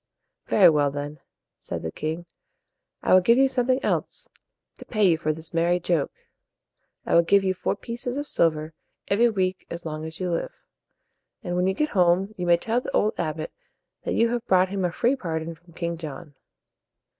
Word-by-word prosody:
"Very - - +6
well, 145 -2 +2
then," 145 +1 -6 0.4
said - - -6
the 80 - -3
king, 160 - -4 0.8
"I - - +3
will 185 - +8
give 230 +6 +4
you 270 0 +5
something 255 0 +1
else - - -1 0.5
to - - -10
pay 215 -4 +2
you 170 - +4
for 155 -1 -1
this 160 +2 -5
merry 170 +2 +2
joke. 170 -5 0 0.9
I - - -1
will 170 - +7
give 195 +4 +3
you 190 -1 +1
four 185 - -2
pieces 240 +4 -5
of 290 0 -3
silver 155 - +1 0.4
every 230 +4 +4
week 190 -3 -1
as 170 0 -6
long 155 -1 -4
as 160 0 -8
you 180 -1 -1
live. 170 - -2 0.9
And 175 -3 -3
when 180 +1 +2
you 190 - +1
get 300 0 0
home, 185 +2 +2
you 180 -1 -4
may 170 0 +6
tell 230 +7 -1
the - - -6
old 215 - +2
abbot 155 -1 -3 0.5
that - - -2
you 230 0 +3
have 240 -1 -3
brought 185 0 +4
him 195 -1 -2
a 175 - 0
free 240 +9 +1
pardon 165 -8 -4
from 170 +1 -20
King 170 0 -3
John." 150 -1 -8
175 Hz, 195 wpm, -25 LUFS, 160-210 Hz, 0.9 s, will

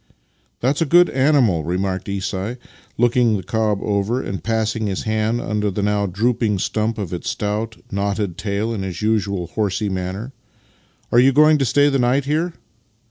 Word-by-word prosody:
" - - -42
That 135 +4 +1
is - - -2
a 165 - +2
good 175 +4 +5
animal," 130 - +3
remarked 95 +3 -2
Isai, 100 +3 -3 0.4
looking 120 -2 +3
the 95 - -6
cob 110 -2 0
over, 105 +4 0
and 100 -6 -5
passing 110 -1 -1
his 95 -2 -3
hand 110 +2 0
under 105 -3 -1
the 100 +1 -3
now 105 0 +1
drooping 110 +2 0
stump 110 +4 -1
of 95 -5 -4
its 90 - -3
stout, 105 +2 -3
knotted 100 -2 -1
tail 105 +4 -2
in 105 - -3
his 95 0 -5
usual 100 -4 0
horsey 105 -1 -1
manner. 95 +7 -4 0.4
" - - -37
Are 120 - +5
you 130 +2 +6
going 155 +2 +5
to 135 - +2
stay 145 +3 +3
the 135 -2 +1
night 130 +3 +2
here? 160 +4 0
110 Hz, 185 wpm, -20 LUFS, 100-120 Hz, 0.4 s, you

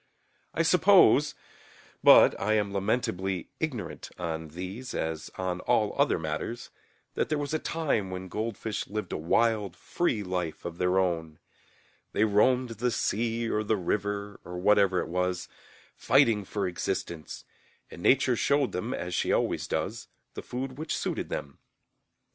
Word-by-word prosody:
I - - +2
suppose - - +5 0.7
(but - - +8
I 105 +2 +2
am 105 -2 0
lamentably 95 -3 -1
ignorant 140 -9 -4
on 80 -2 -4
these 95 +10 -7
as 80 -1 -3
on 90 -1 -2
all 110 0 +1
other 140 +1 +3
matters) 80 +9 -4 0.4
that - - -1
there 155 - +1
was 145 0 -3
a 155 - +1
time 145 -14 -1
when 95 0 -6
goldfish 110 +1 -3
lived 105 -3 -4
a - - -1
wild 105 +3 +1
free 115 - -1
life 90 -4 -3
of 85 0 -6
their 90 +1 +2
own. 80 -4 0 0.8
They 105 - +2
roamed 120 +4 +3
the 115 +2 -1
sea 115 +1 -1
or 105 -1 0
the 105 0 +1
river, 100 +2 -2
or 90 - -7
whatever 100 0 +3
it - - -5
was, 90 +1 -1 0.5
fighting 105 -3 +3
for 100 +1 -2
existence, 85 -2 -4 0.5
and - - -10
Nature 130 +3 +4
showed 140 +3 +2
them, 110 +8 -3
as 90 0 -5
she - - 0
always - - 0
does, - - -3 0.3
the - - -6
food 130 +2 -5
which 155 - -2
suited - - -3
them. 70 - -5
100 Hz, 150 wpm, -28 LUFS, 90-115 Hz, 0.8 s, but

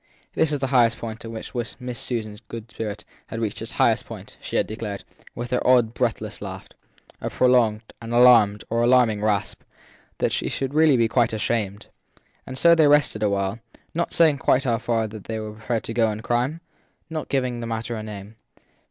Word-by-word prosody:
This 160 - +2
was 145 -1 -1
the 125 -3 +3
moment 115 -1 -6
at - - -6
which 110 -1 -8 0.3
Miss 125 -1 -5
Susan 115 -5 -3
s 105 - -13 0.3
spirit 105 -2 -5 0.2
had 115 - -5
reached 110 -3 -3
its - - -5
highest - - +2
point: - - -10
she - - -6
had - - +3
declared, 110 -2 -6 0.3
with 120 +1 -5
her 125 - +1
odd, 120 -3 +4
breathless 115 -3 -2
laugh, 95 -2 -7 0.5
a - - -2
prolonged, 120 -4 +3 0.2
an 115 0 -7
alarmed 120 -4 +6
or 115 0 +1
alarming 120 -3 +4
gasp, 105 -2 -1 0.6
that - - 0
she - - -1
should 135 0 -3
really 155 -3 +5
be 115 -1 +3
quite 115 -1 +2
ashamed. 105 -2 -2 0.6
And 130 - -6
so 170 +4 +6
they 160 -3 +5
rested 145 -7 +3
awhile; 100 +1 0 0.3
not 170 +1 -1
saying 155 -4 +4
quite 135 - +2
how 120 -4 0
far 115 -2 0
they 110 +1 -6
were 110 -1 -6
prepared 110 +1 -3
to 115 - -5
go 115 -1 +2
in 105 +1 -6
crime 125 +8 -1 0.5
not 160 -1 -5
giving 125 -3 -1
the 115 - -5
matter 115 +1 -3
a 110 - -4
name. 105 0 -9
115 Hz, 190 wpm, -23 LUFS, 110-125 Hz, 0.6 s, alarmed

